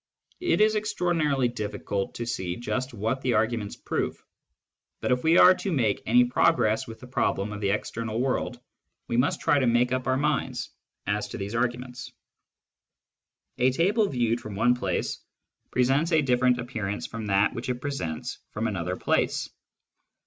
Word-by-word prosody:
It 350 -10 +1
is 215 0 +5
extraordinarily 165 -10 +1
difficult 105 -3 -3
to 120 - -4
see 95 -6 -3
just 130 +3 -3
what 115 +4 -2
the 125 -3 +1
arguments 110 -1 0
prove; - - -3 0.8
but - - -1
if 125 0 +1
we 165 +2 +5
are 185 - +9
to 190 +1 -4
make 130 -9 +1
any 125 +2 +6
progress 120 -3 +2
with 110 -1 -9
the 125 - -11
problem 105 -4 -1
of 105 - -6
the 100 - +1
external 110 +2 -2
world, 130 +1 -1 0.5
we - - -2
must 125 +4 +1
try 145 - +3
to 130 - +2
make 120 +1 +3
up 130 0 -1
our 130 0 +2
minds 135 -3 -1 0.3
as 105 +1 -1
to 105 - -7
these 100 0 -5
arguments, 125 +1 -2 1.5
A 125 - +5
table 200 - +2
viewed 120 -3 0
from 105 -2 -7
one 120 +4 +4
place 95 -7 -2 0.5
presents 135 +7 +2
a 155 -2 +4
different 125 -1 +3
appearance 110 -5 -4
from 115 -2 -6
that 100 +1 +3
which 120 +2 -5
it 125 - +1
presents 125 - -4
from 110 - -3
another 90 -3 -2
place. - - 0
120 Hz, 165 wpm, -26 LUFS, 110-135 Hz, 1.5 s, are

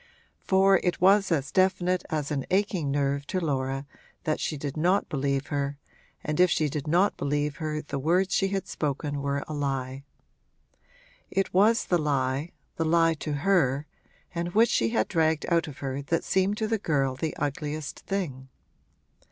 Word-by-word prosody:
For 195 0 +4
it 180 - -1
was 195 +1 +4
as 145 -3 0
definite 185 0 +2
as 150 -2 -2
an 140 -3 -2
aching 190 -6 +1
nerve 140 0 0
to 185 - -1
Laura 135 -4 -2 0.4
that 155 - 0
she 155 - -2
did 140 -1 -5
not 180 +5 +2
believe 140 -1 -1
her, 140 0 -1 0.5
and 150 +1 -2
if 180 0 +6
she 155 -2 +1
did 145 +1 -4
not 180 +6 +2
believe 145 0 -1
her 155 -1 -3
the 140 - -4
words 180 +7 +2
she 195 - +2
had 195 -1 -3
spoken 145 -1 -2
were 140 0 -1
a 155 - -5
lie. 135 -2 -2 1.3
It 195 0 -1
was 215 +5 +4
the 175 - +2
lie, 140 0 0 0.3
the 165 - 0
lie 165 0 +4
to 150 - -4
her 145 -8 +3 0.5
and 175 +1 -3
which 230 +2 +5
she 115 - +2
had 110 -1 +1
dragged 160 -1 +1
out 170 -1 +2
of 145 - -9
her 135 +1 -2
that 165 +4 -1
seemed 190 +2 +1
to 220 - -1
the 225 0 0
girl 140 -7 +1
the 155 +4 -3
ugliest 145 +1 -3
thing. 140 -10 -4
155 Hz, 175 wpm, -27 LUFS, 140-180 Hz, 1.3 s, if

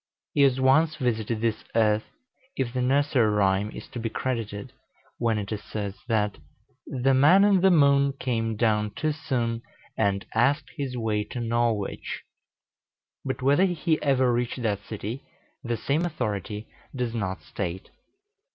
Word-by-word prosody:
He 145 - +2
has 135 -2 +4
once 145 +5 +4
visited 115 -5 -1
this 115 -1 0
earth, 110 -1 +3 0.5
if 125 -2 -2
the 130 - 0
nursery 135 -3 +3
rhyme 100 0 +2
is - - -9
to 120 - -6
be 115 0 -2
credited, 110 -5 -4 0.5
when 115 -2 +1
it 100 0 -4
asserts 105 -1 -5
that 105 -6 0 0.5
"The 135 0 +1
Man 150 +9 +6
in 200 -3 +4
the 190 - +6
Moon 140 -4 +4
Came 115 -4 -2
down 105 -2 +1
too 155 0 0
soon, 125 -7 -2 0.3
And 100 -2 0
asked 140 +6 +2
his 135 -5 -3
way 110 -2 0
to 120 - -6
Norwich;" 115 -3 -1 1.0
but 130 -1 -3
whether 145 +8 +4
he 170 -3 0
ever 130 -3 +3
reached 120 +1 -2
that 105 -2 -1
city, 110 +5 -5 0.4
the 120 -2 -2
same 140 +9 0
authority 105 - -3 0.3
does 125 -3 -2
not 100 -5 -3
state. 95 -1 -5
120 Hz, 150 wpm, -26 LUFS, 105-140 Hz, 1.0 s, Man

